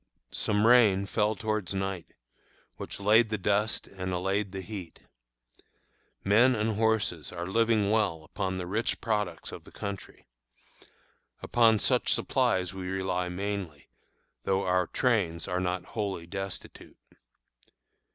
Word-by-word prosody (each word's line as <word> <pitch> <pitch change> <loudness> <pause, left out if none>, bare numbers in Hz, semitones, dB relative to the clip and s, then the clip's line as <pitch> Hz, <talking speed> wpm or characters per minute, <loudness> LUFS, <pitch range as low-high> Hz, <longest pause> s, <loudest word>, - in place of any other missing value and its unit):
Some 105 0 +1
rain 110 -5 +6
fell 105 +1 +1
towards 110 -2 -2
night, 95 -3 -4 0.6
which - - -6
laid 110 +3 +5
the 110 - -1
dust 105 +2 0
and 95 -1 -5
allayed 95 +2 -1
the 95 -1 -5
heat. 95 -3 -8 1.2
Men 120 +6 +5
and 110 0 0
horses 110 -7 0
are 85 -1 -5
living 110 +1 +2
well 100 -8 +1
upon 95 +4 -3
the 90 - -4
rich 105 +6 -1
products 105 -8 -2
of - - -9
the - - -15
country. 100 -1 -7 1.2
Upon 115 -2 +4
such - - +2
supplies 90 -1 +1
we 95 -1 -6
rely 95 -1 -1
mainly, 95 -5 -4 0.5
though 95 0 +1
our 90 -1 +2
trains 100 -10 0
are 90 -1 -1
not 90 0 -2
wholly 100 -6 -3
destitute. 95 +1 -7
100 Hz, 130 wpm, -29 LUFS, 90-110 Hz, 1.2 s, rain